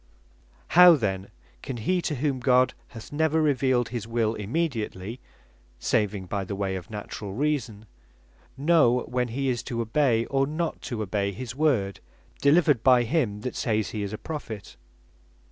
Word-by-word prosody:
By - - -33
What - - -32
Marks - - -33
Prophets - - -14
Are 180 - +7
Known 180 - +11
How 170 -3 +8 0.3
then - - -26 0.3
can 130 - -5
he, 180 +11 0
to 155 - -2
whom 135 0 -1
God 125 0 +3
hath 115 -2 -11
never 160 +1 +1
revealed 130 -5 +2
his 115 -3 -5
Wil 115 -1 0
immediately 115 - -3 0.6
(saving 100 - 0
by 100 +2 -3
the 100 +1 -5
way 95 -1 -2
of 90 -2 -7
natural 105 -2 -6
reason) 120 -5 -2 0.7
know 140 -5 +4
when 125 0 -1
he 135 +4 -2
is 120 -2 0
to 120 -1 -5
obey, 115 0 +2
or 135 0 +1
not 155 +2 -3
to 110 -3 -2
obey 100 0 -1
his 115 +4 -6
Word, 130 -10 +1 0.4
delivered 150 -3 +4
by 125 -1 +5
him, 115 -6 0
that 125 - -4
sayes 110 -2 -1
he 105 - -4
is 100 -1 -3
a 110 - -4
Prophet? 115 -10 -7
120 Hz, 180 wpm, -26 LUFS, 105-140 Hz, 0.7 s, Known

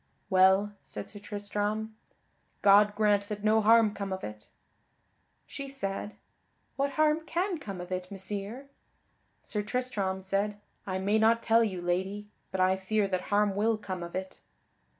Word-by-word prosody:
"Well," 190 +2 +5
said - - -7
Sir 205 - -9
Tristram, 205 +1 -3 0.7
"God 205 +1 +6
grant 205 -1 +2
that 210 -1 -5
no 220 +1 +4
harm 220 0 +5
come 200 -2 -5
of 190 0 -4
it." 105 0 -7 1.0
She 275 -1 -7
said, 205 -5 -4 0.6
"What 275 0 0
harm 310 +2 +2
can 355 0 -1
come 195 -8 -7
of 180 +1 -8
it, 185 0 -3
Messire?" 200 +6 -5 0.8
Sir 210 - -3
Tristram 205 -5 -2
said: 200 +2 -1 0.3
"I 185 -1 -1
may 200 +3 +2
not 230 +1 +4
tell 230 0 +5
you, 185 -5 -3
Lady, 190 +4 -1 0.2
but 190 - -4
I 185 +1 +3
fear 200 +2 0
that 185 -1 0
harm 205 0 +3
will 220 +2 +2
come 185 -4 -5
of 170 +1 -7
it." 185 0 -5
205 Hz, 155 wpm, -29 LUFS, 190-220 Hz, 1.0 s, God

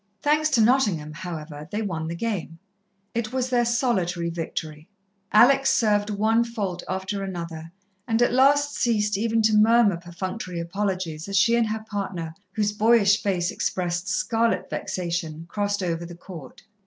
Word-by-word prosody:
Thanks 305 +1 +3
to 260 -7 +3
Nottingham, 210 - +2
however, 155 -3 -7
they 215 +2 -2
won 165 -5 -3
the 165 - -4
game. 180 -5 -3 0.6
It 230 -1 -2
was 255 0 -2
their 240 -1 +3
solitary 190 -9 0
victory. 160 -1 -5 0.4
Alex 270 +5 +6
served 210 -4 +2
one 220 +3 +2
fault 205 -7 -4
after 190 +2 -3
another, 165 -3 -6 0.4
and 225 -1 +1
at 240 0 +3
last 285 +3 +4
ceased 210 -3 +1
even 225 +2 +1
to 215 0 +3
murmur 215 -3 +5
perfunctory 180 +1 -6
apologies 180 -2 -3
as 195 - 0
she 230 +4 +4
and 235 -1 +2
her 220 0 -4
partner, 185 -6 -4 0.2
whose 210 -1 0
boyish 215 -1 +4
face 180 -4 0
expressed 175 0 -2
scarlet 225 0 0
vexation, 170 -3 -3
crossed 205 +1 -2
over 170 -1 -2
the 170 0 -9
court. 165 -6 -11
200 Hz, 155 wpm, -24 LUFS, 170-230 Hz, 0.6 s, Alex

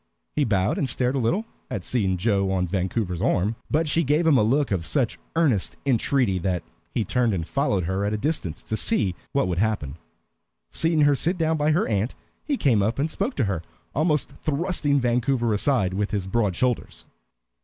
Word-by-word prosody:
He 150 - +2
bowed 100 -2 +1
and 135 - 0
stared 125 +1 0
a - - +1
little 175 - 0 0.2
at 95 - -4
seeing 95 -7 0
Joe 100 0 +1
on 95 -1 +1
Vancouver's 90 0 -2
arm, 100 +5 +1
but 155 +2 +1
she 160 +3 +2
gave 150 +4 +2
him 160 -3 +5
a 125 - +5
look 130 +5 +2
of 95 -4 0
such 125 - 0 0.2
earnest 140 - +1
entreaty 125 -5 +2
that 90 -2 -1 0.3
he 110 - -1
turned 120 -1 +1
and 85 -2 -3
followed 135 -10 0
her 95 +4 -1
at 100 - 0
a 105 - 0
distance 125 - -2
to 110 - -3
see 110 - +1 0.2
what 140 -8 +1
would 90 -1 -1
happen. 100 -11 -1 0.7
Seeing 165 -1 +1
her 145 -1 +5
sit 170 +6 0
down 160 -1 +1
by 150 0 +1
her 155 +2 +2
aunt, 105 +3 -1 0.3
he 285 -2 -1
came 120 - +3
up 110 +4 0
and 150 +4 0
spoke 250 - -2
to - - +1
her, 95 -6 -1 0.3
almost 150 -1 +1
thrusting 150 -2 +1
Vancouver 120 -1 +1
aside 105 -4 +1
with 105 +2 -1
his 100 -3 -2
broad 100 -2 0
shoulders. 120 - -2
115 Hz, 195 wpm, -24 LUFS, 95-145 Hz, 0.7 s, him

